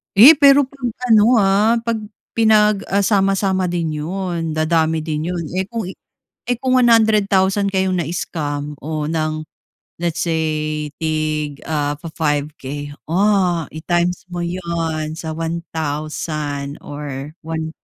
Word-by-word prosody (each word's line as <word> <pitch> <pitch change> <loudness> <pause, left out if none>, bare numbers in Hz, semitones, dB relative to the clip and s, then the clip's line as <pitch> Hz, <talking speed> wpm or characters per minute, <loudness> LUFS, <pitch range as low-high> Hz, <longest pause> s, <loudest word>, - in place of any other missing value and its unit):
Eh, 235 +10 +11
pero 285 -1 +7
'pag 270 -2 -5 0.2
ano 220 +3 +6
ah, 210 +2 +4
'pag 230 -1 -1 0.3
pinag, 215 -2 +3
ah, 200 +1 +1
sama-sama 195 -2 +2
din 165 -3 -2
'yon, 170 -1 -3
dadami 160 0 +1
din 155 0 -3
'yon. 175 -1 -2
Eh 190 +1 -2
kung 230 -1 -4 0.4
eh 245 -1 -4
kung 255 0 +1
100 220 -4 +4
thousand 195 +1 +2
kayong 190 -1 +1
na-scam 150 -3 -3
o 155 0 -3
ng 155 -1 -2 0.6
let's 170 -1 -1
say 155 -2 -1
tig, 155 -2 -2
ah, 145 -2 0
fa-5 155 -3 -1
K. 145 +2 -6 0.2
Ah, 180 -1 +2
i-times 175 +2 -1
mo 175 - -3
'yon 170 -3 -3
sa 160 0 -6
1000 155 -3 -4
or 145 +1 -7
1 160 0 -3
170 Hz, 130 wpm, -19 LUFS, 155-195 Hz, 0.6 s, Eh